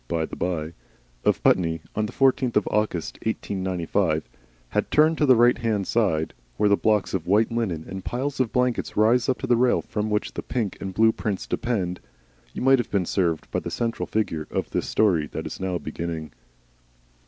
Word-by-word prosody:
by 80 -1 0
the - - -8
bye 85 -2 -2 0.5
of - - +1
Putney, 80 -2 +3 0.2
on 105 0 0
the - - -8
14th 130 -2 +2
of 105 - +2
August, 105 -6 -1
1895, 95 -7 -1 0.4
had - - -1
turned 155 +2 +4
to 150 - +3
the 130 - +7
right 120 +1 +4
hand 110 -5 0
side, 90 -10 +1 0.2
where 105 - +3
the 100 - +5
blocks 105 -1 +1
of 90 -4 -2
white 105 +5 +3
linen 100 -9 -2
and 95 0 -6
piles 135 +6 -3
of 125 -4 +1
blankets 125 -1 0
rise 115 +4 +4
up 130 - +1
to - - -4
the 125 -2 +3
rail 125 +1 +2
from 105 0 -3
which 105 0 -1
the - - -4
pink 110 -6 -2
and 95 -1 -5
blue 110 +1 +5
prints 105 -4 -3
depend, 95 -7 -2 0.5
you - - -5
might 135 0 +5
have 120 - -2
been 95 -3 0
served 85 -3 -1
by - - 0
the - - -5
central 115 -1 -2
figure 80 -8 -2
of - - -3
this - - -2
story 90 -9 +2
that - - -6
is - - -6
now 95 -1 -1
beginning. 80 -3 -5
105 Hz, 200 wpm, -24 LUFS, 90-120 Hz, 0.5 s, the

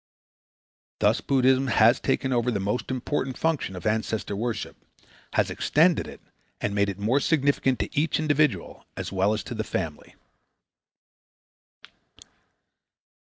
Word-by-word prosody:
Thus - - +2
Buddhism 130 0 +2
has 115 -1 +4
taken 130 -1 0
over 120 0 +1
the 110 -5 -1
most 100 +5 -2
important 130 +1 -2
function 160 - -1
of 90 - -8
ancestor 110 -1 -1
worship, 115 +2 -3 0.6
has - - +1
extended 165 +3 +2
it - - -11 0.4
and 100 - -2
made 100 0 +1
it 95 - -5
more 110 +7 +1
significant 140 -3 +1
to - - -4
each 150 +1 +1
individual 155 -1 0
as - - -4
well 95 +1 +2
as 110 - -4
to 125 - -7
the 110 -1 -3
family. 80 -8 -5
125 Hz, 130 wpm, -26 LUFS, 105-140 Hz, 0.6 s, has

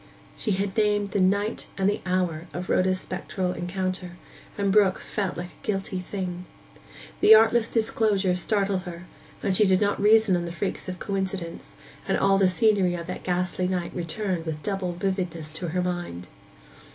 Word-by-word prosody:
She 215 - -1
had 195 0 -2
named 205 -2 +2
the 200 - 0
night 200 +4 +1
and 190 -1 +2
the 205 - 0
hour 180 -3 -1
of 180 +1 -5
Rhoda's 185 0 +2
spectral 185 0 -3
encounter, 185 0 -3 0.4
and 200 -1 +1
Brook 200 -2 +4
felt 195 -5 -3
like 175 +1 -5
a 155 - -23
guilty 195 -2 -2
thing. 180 -1 -5 0.7
The 220 - +9
artless 225 +1 +4
disclosure 215 -4 +1
startled 195 +1 0
her; 175 -1 -8 0.5
she 205 +2 +5
did 190 -1 +4
not 205 -1 +1
reason 215 -2 +5
on 175 -1 -1
the 170 - -5
freaks 190 +1 -4
of 180 - -5
coincidence; 190 -3 -4 0.3
and - - +2
all 195 0 +3
the 190 -2 +5
scenery 195 -3 +3
of 170 -1 -5
that 180 - -6
ghastly 180 0 -1
night 180 -2 -2
returned 175 0 -3
with 155 -1 -4
double 195 -3 -2
vividness 175 -4 -3
to 165 +3 -4
her 180 +2 -1
mind. 175 - -4
185 Hz, 170 wpm, -26 LUFS, 180-200 Hz, 0.7 s, The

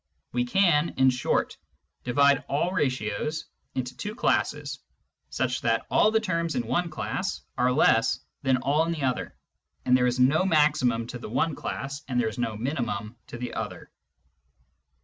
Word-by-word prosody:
We 125 0 0
can, 170 +2 +3
in 130 0 +5
short, 125 - -1 0.5
divide 140 +2 +3
all 155 +6 +1
ratios 130 - -1 0.3
into 125 -1 -3
two 210 +10 -5
classes - - 0 0.5
such - - -1
that - - +1
all 215 - +5
the 220 0 +3
terms 170 -6 -1
in 245 - -1
one 175 -1 0
class 155 - -3
are 125 +1 +2
less 115 -4 +3 0.2
than 130 -2 +2
all 145 +4 +2
in 170 - 0
the 155 -4 -4
other, 130 -2 -1 0.5
there 125 0 +4
is 125 +1 -1
no 140 +7 +4
maximum 150 -9 +2
to 120 +1 -7
the - - -8
one 135 +7 +1
class, 140 0 -5
and 125 -2 0
there 115 -2 +1
is 115 +3 -8
no 115 -3 -1
minimum 120 -4 -3
to - - -8
the 125 +1 -5
other. - - -6
130 Hz, 165 wpm, -26 LUFS, 125-155 Hz, 0.5 s, in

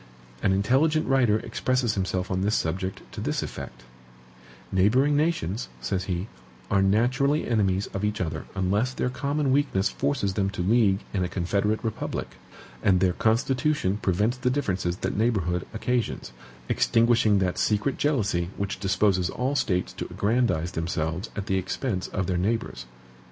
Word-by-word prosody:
An 95 - +2
intelligent 135 +11 +2
writer 125 -5 +3
expresses 120 0 0
himself 95 0 -2
on 95 0 0
this 105 +3 +1
subject 95 +3 -2
to - - -6
this - - -1
effect: - - -8 0.9
"NEIGHBORING 125 +10 +3
NATIONS 145 - 0
(says 90 +10 -2
he) 90 +1 -2 0.4
are 100 - +4
naturally 125 +9 +2
enemies 100 -4 +1
of 100 - -3
each 105 0 -1
other 80 -3 -3
unless 100 +7 0
their 125 - -1
common 140 +1 -1
weakness 130 -7 +2
forces 135 -9 -1
them 95 -1 0
to 95 -2 -3
league 100 -1 +3
in 95 -3 0
a 90 - -2
CONFEDERATE 100 +5 0
REPUBLIC, 110 -2 -3 0.5
and 95 -2 +4
their 90 -1 +2
constitution 120 - +1
prevents 105 +7 +1
the 125 0 0
differences 95 -10 -1
that - - -3
neighborhood 95 -6 0
occasions, 120 - -2 0.4
extinguishing 115 -2 +3
that 95 -2 0
secret 105 +6 +1
jealousy 105 - +1
which 100 -1 -3
disposes 95 -2 +2
all 130 +3 -1
states 90 -9 0
to - - -5
aggrandize 105 -6 +1
themselves 80 +3 -2
at 100 - -3
the 95 -1 +1
expense 95 +1 -2
of 95 -2 -2
their 90 -1 0
neighbors." 95 - -2
100 Hz, 150 wpm, -26 LUFS, 95-125 Hz, 0.9 s, are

